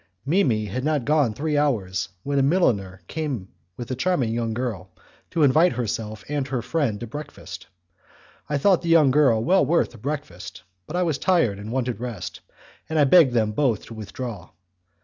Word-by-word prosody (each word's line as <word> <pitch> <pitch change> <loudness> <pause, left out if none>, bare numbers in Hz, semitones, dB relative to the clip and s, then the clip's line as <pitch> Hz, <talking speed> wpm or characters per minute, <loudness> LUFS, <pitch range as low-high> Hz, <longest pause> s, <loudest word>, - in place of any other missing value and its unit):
Mimi 135 - +2
had 125 +6 -4
not 150 -1 +1
been - - -11
gone 145 -6 +2
three 150 +2 -1
hours 110 -11 0
when 140 0 0
a - - +4
milliner 105 - +1
came 140 -12 -4 0.3
with 120 +1 -6
a - - -1
charming 130 -6 0
young 115 -1 -1
girl, 110 -6 -4 0.4
to 160 - +1
invite 155 +6 +5
herself 110 -3 -4
and 145 -2 -2
her 130 -4 -2
friend 140 -11 -1
to - - -3
breakfast; 120 -8 -9 0.8
I 145 - +1
thought 185 +5 +3
the 170 - -3
young 155 -5 +6
girl 130 -6 +4
well 190 +7 +4
worth 165 +5 +1
a - - -13
breakfast, 125 - -6 0.2
but 170 - -6
I 180 - +2
was 160 -5 -1
tired 165 - +2
and 105 +2 -7
wanted 125 -2 -2
rest, 115 -7 -6 0.5
and 160 - -1
I 150 - +6
begged 140 -2 +6
them 110 -3 +2
both 115 -2 0
to - - -10
withdraw. 110 -2 -7
130 Hz, 190 wpm, -24 LUFS, 110-150 Hz, 0.8 s, young